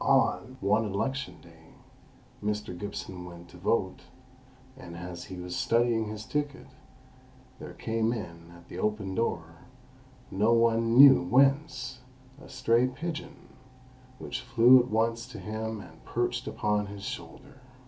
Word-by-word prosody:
On 130 +1 +2
one 105 +3 +2
election 135 +7 -3
day, 80 -1 -18 0.7
Mr. 105 -3 -2
Gibson 95 -1 -6
went 85 -1 -11
to 90 - -14
vote, 95 +1 0 0.7
and 85 -10 -10
as 90 0 -7
he 95 - -8
was 90 0 -6
studying 115 -1 +2
his 105 0 -6
ticket, 145 +1 -3 0.9
there - - -9
came 115 0 -1
in 85 -7 -7
at 85 0 -16
the 90 - -8
open 105 -2 -1
door, 85 -6 -2 0.7
no 105 +4 +3
one 115 0 +3
knew 135 -6 +10
whence, 130 - +2 0.4
a - - -13
stray 120 +2 +2
pigeon, 160 +5 -7 0.7
which - - -5
flew 120 +3 +6
at 125 - -1
once 115 +2 0
to 125 - -10
him 110 0 -4
and 80 -3 -15
perched 120 +2 -2
upon 105 -5 0
his 100 -1 -9
shoulder. 130 - -8
110 Hz, 140 wpm, -28 LUFS, 90-120 Hz, 0.9 s, knew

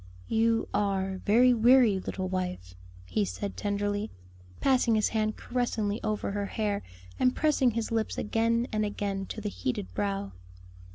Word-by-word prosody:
"You 225 0 +2
are 195 -2 0
very 245 +4 +6
weary, 235 -3 +5
little 185 0 -4
wife," 180 - -3 0.3
he 210 - 0
said 200 +1 -4
tenderly, 205 +1 -1 0.5
passing 255 -4 +3
his 215 - +2
hand 215 -1 -1
caressingly 230 -3 -1
over 215 -2 -1
her 200 0 -2
hair 205 -2 -1 0.4
and 255 0 +3
pressing 295 -4 +3
his 230 -1 -3
lips 225 -1 -1
again 230 +2 +1
and 215 -1 0
again 200 -2 -3
to - - -6
the 210 -1 -3
heated 100 - -4
brow. 100 0 -2
210 Hz, 150 wpm, -29 LUFS, 195-230 Hz, 0.5 s, very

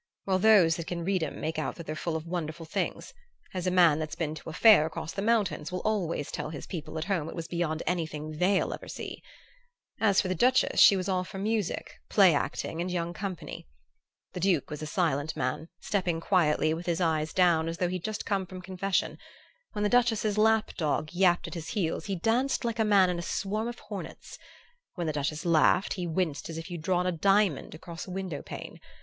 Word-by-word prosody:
Well, 190 -1 +1
those 190 -6 +5
that 170 - -6
can 170 -1 -4
read 190 -1 +1
'em 155 - -4
make 160 +1 -2
out 155 - -3
that 170 - -9
they're 155 - -4
full 160 +1 -3
of 160 0 -4
wonderful 165 -2 -4
things; 160 - -3 0.4
as 185 -1 -3
a - - +4
man 175 -4 +5
that's 155 -1 -4
been 155 -2 -2
to 155 - -8
a - - -7
fair 205 -5 +7
across 160 0 -5
the 195 - -3
mountains 205 -8 +1
will 180 - -3
always 175 -9 -1
tell - - -4
his 150 -3 -7
people 160 -3 -6
at 155 - -3
home 175 -5 -1
it - - -8
was 165 -2 -5
beyond 165 -2 -2
anything 155 -3 -3
they'll 190 +2 +2
ever - - -9
see. - - -7 0.8
As 205 -3 +4
for 190 - +1
the 185 - 0
Duchess, 255 +7 +3
she 200 - +8
was 185 0 -3
all 185 -2 +1
for 190 - -9
music, 210 -1 -2
play 190 -5 +6
acting 160 +3 -2
and 180 - -2
young 175 -1 -2
company. 185 - -6 0.7
The - - -5
Duke 175 -6 +1
was 150 0 -5
a 155 - -4
silent 155 -3 0
man, 135 +6 -2
stepping 180 -5 -1
quietly, 155 -3 +2
with 170 +2 -6
his 170 -1 0
eyes 160 -3 +1
down, 170 -3 +3
as 165 - -4
though 180 - +1
he'd 180 -1 -4
just 215 0 -4
come 195 -2 -1
from 185 +1 -8
confession; 185 +1 -2 0.5
when 210 -1 -2
the - - +3
Duchess's 225 -3 +2
lap 220 0 +3
dog 155 -1 -1
yapped 180 -1 +3
at - - -8
his 165 -3 -6
heels 170 -1 -1
he 200 -2 -2
danced 235 +8 +1
like 230 -1 -2
a - - +4
man 200 -4 +4
in 175 - -3
a - - -3
swarm 210 +5 -2
of 240 0 -5
hornets; - - -8 0.6
when 175 -3 -3
the 155 - -1
Duchess 150 +2 -2
laughed 170 +3 +3
he 180 -3 -4
winced 160 -3 -2
as 165 - -5
if 165 +3 -7
you'd 170 -2 -5
drawn 180 +2 +1
a 180 - +1
diamond 195 -3 +2
across 170 +2 -8
a - - -8
window 180 -6 -4
pane. - - -8
175 Hz, 220 wpm, -28 LUFS, 160-195 Hz, 0.8 s, she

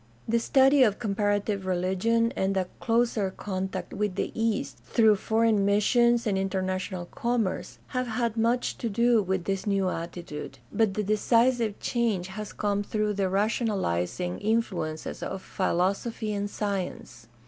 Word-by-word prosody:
The 235 +1 +2
study 270 +3 +4
of 215 -5 +4
comparative 205 -2 -1
religion, 190 +6 +1
and 195 0 0
a 185 -1 0
closer 230 -4 +1
contact 190 0 -4
with 210 -3 -1
the - - -2
East 205 - -1
through 215 - +4
foreign 220 0 +2
missions 235 +4 +3
and 195 -3 +1
international 185 -1 -2
commerce, 235 -2 -2
have 255 -1 -2
had 230 -1 -1
much 235 +2 0
to 235 - -2
do 235 +2 +3
with 190 -2 -1
this 195 +1 -2
new 195 -2 +2
attitude; 155 -5 -6 0.2
but 220 -4 +2
the 210 - 0
decisive 230 +1 +2
change 220 -7 0
has 210 +2 -6
come 205 -1 -1
through 210 0 -1
the 195 -2 0
rationalizing 190 - 0
influences 200 -8 -2
of 190 - -5
philosophy 200 +4 -1
and 205 0 -2
science. 185 - -4
205 Hz, 140 wpm, -27 LUFS, 190-230 Hz, 0.2 s, study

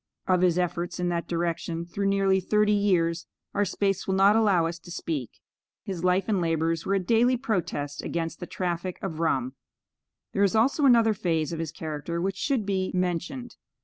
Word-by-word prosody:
Of 185 -1 +3
his 180 -2 +3
efforts 175 -1 -2
in 180 0 0
that 170 -1 -2
direction 170 0 -2
through 195 +3 -2
nearly 195 -1 +3
thirty 210 +3 +2
years, 170 -5 +1 0.3
our 205 - +2
space 195 0 -1
will 190 - +1
not 195 +2 +5
allow 200 -7 +3
us 165 +1 -4
to 175 - -14
speak. 155 -7 -3 0.5
His 185 -3 -5
life 185 +1 +2
and 205 -4 +1
labors 165 0 0
were 195 - +2
a - - +2
daily 235 +6 +3
protest 170 - -2
against 165 -1 -3
the 175 - -6
traffic 180 0 -3
of 165 -5 -4
rum. 130 -6 0 0.8
There 195 - 0
is 200 +1 +3
also 270 +6 +3
another 230 -3 +5
phase 165 -5 -1
of 165 - -4
his 165 -2 -3
character 160 +1 -4
which 190 +2 -2
should 260 -5 0
be 190 -2 0
mentioned. 180 +7 -2
180 Hz, 185 wpm, -26 LUFS, 165-200 Hz, 0.8 s, not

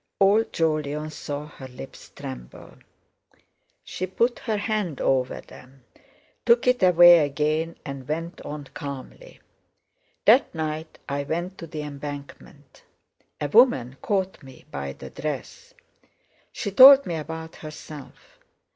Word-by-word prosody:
Old 205 +3 +4
Jolyon 155 -1 -1
saw 145 -1 -5
her 145 -3 -11
lips 125 - -11
tremble. - - -9 1.1
She 185 - -5
put 235 +6 0
her 220 -3 -2
hand 205 - -2
over 130 -1 0
them, 130 0 -16 0.6
took 235 0 +4
it 250 0 +3
away 175 -1 +8
again, 155 +3 -1
and 135 -2 -7
went 165 +3 -4
on 150 0 -7
calmly: 140 - -9 0.8
"That 255 - +5
night 155 0 -4
I 140 0 -2
went 175 +6 -4
to 165 - -7
the 155 -1 -6
Embankment; 145 -1 -9 0.6
a 145 - -1
woman 145 - +4
caught 190 -3 -1
me 130 -3 -15
by 70 0 -5
the - - -11
dress. 155 - -6 0.8
She 200 - -4
told 270 +6 +9
me 175 - -3
about 160 +1 -6
herself. 155 - -11
155 Hz, 125 wpm, -24 LUFS, 140-190 Hz, 1.1 s, told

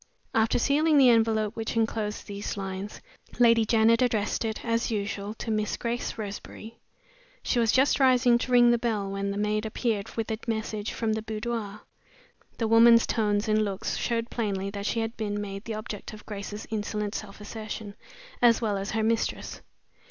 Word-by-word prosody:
After 220 0 +2
sealing 295 +5 +3
the 265 -3 +7
envelope 220 -2 +2
which 225 0 -4
inclosed 220 -2 -1
these 205 0 -5
lines, 195 +1 -5 0.4
Lady 230 -2 +5
Janet 225 +2 +4
addressed 225 -4 +1
it, 220 +1 -4
as 230 +1 0
usual, 205 -1 -3
to 225 - -4
"Miss 215 -1 -1
Grace 240 0 -3
Roseberry." 215 +2 -8 0.6
She 245 - +1
was 230 -2 +3
just 270 +3 +3
rising 250 -2 +5
to 250 - -4
ring 240 -1 +6
the 240 - +2
bell, 215 -4 -1
when 195 0 -2
the 200 - -3
maid 210 +1 0
appeared 220 -2 -2
with 225 -1 -2
a 220 - -2
message 220 -2 -2
from 225 -2 -1
the 220 - -2
boudoir. 215 -1 -4 0.8
The 225 - 0
woman's 230 +1 +7
tones 210 -1 0
and 215 0 +3
looks 195 -2 -3
showed 235 0 -2
plainly 200 -4 -2
that 200 0 -4
she 230 - 0
had 225 +1 -3
been 205 -2 -2
made 195 0 -6
the 225 - -4
object 215 -1 -7
of 215 - -12
Grace's 210 0 -6
insolent 210 -1 -2
self 205 -2 -7
assertion 215 -1 -7 0.5
as 235 -2 +5
well 210 -4 -1
as 195 - -4
her 220 0 -1
mistress. 225 +1 -1
220 Hz, 180 wpm, -27 LUFS, 210-230 Hz, 0.8 s, the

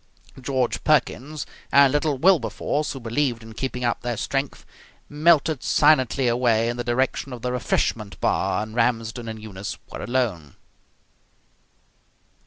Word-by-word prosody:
George 130 -1 -1
Perkins 150 0 0 0.3
and 140 -1 +6
little 145 -1 +1
Wilberforce, 150 -2 +1
who 135 - -7
believed 120 0 -1
in 110 0 -11
keeping 125 +1 -4
up 120 - 0
their 120 -2 -3
strength, 135 +4 -3 0.4
melted 155 -2 +3
silently 135 -3 +3
away 120 -1 +2
in 120 - -3
the 120 - -2
direction 130 +3 -1
of 125 -2 -8
the 125 - -1
refreshment 115 -4 -1
bar, 100 +3 0
and 110 0 -9
Ramsden 115 0 -1
and 110 0 -6
Eunice 100 -3 -7
were - - -7
alone. 110 - -2
125 Hz, 135 wpm, -23 LUFS, 115-140 Hz, 0.4 s, and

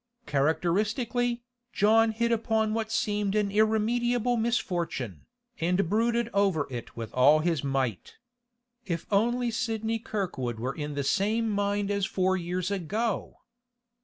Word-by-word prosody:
Characteristically, 215 - 0 0.3
John 225 +2 +4
hit 235 +2 0
upon 220 -1 +1
what 220 0 -2
seemed 205 -2 0
an 210 -2 +1
irremediable 230 +3 +2
misfortune, 170 - -2 0.3
and 180 +3 +1
brooded 235 +2 +2
over 195 -7 +2
it 120 -1 -7
with 115 -2 -6
all 140 +4 +6
his 165 -4 0
might. 135 -8 -2 0.7
If 170 -3 -3
only 240 +4 +2
Sidney 225 0 -1
Kirkwood 180 - -3
were 130 +3 -2
in 150 -1 -5
the 140 - -1
same 220 +9 +1
mind 205 0 0
as 200 -1 0
four 190 0 +1
years 180 +1 -2
ago! 200 +4 -2
205 Hz, 130 wpm, -28 LUFS, 165-225 Hz, 0.7 s, all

